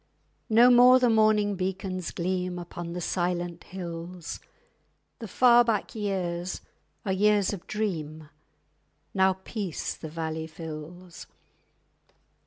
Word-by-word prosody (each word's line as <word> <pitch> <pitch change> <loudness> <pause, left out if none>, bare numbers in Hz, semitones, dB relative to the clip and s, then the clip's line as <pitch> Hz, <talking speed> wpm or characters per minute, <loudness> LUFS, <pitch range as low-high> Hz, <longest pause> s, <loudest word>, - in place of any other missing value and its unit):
_ - - -42 0.5
No 235 +3 +7
more 250 +1 +8
the 250 -2 +3
morning 215 -2 +3
beacons 185 -1 -3
gleam 180 0 -2
Upon 175 -1 -7
the 180 - -4
silent 175 -1 -2
hills; 170 -1 -7 0.8
The 225 - -6
far 240 +3 +5
back 225 -2 -1
years 185 -5 -3 0.4
are 190 - 0
years 205 0 +3
of 190 - -8
dream— 160 -8 -3 0.9
_Now 190 -1 +3
peace 200 -8 -4
the 160 - -8
valley 160 0 -4
fills. 165 +2 -9
185 Hz, 115 wpm, -27 LUFS, 170-210 Hz, 0.9 s, more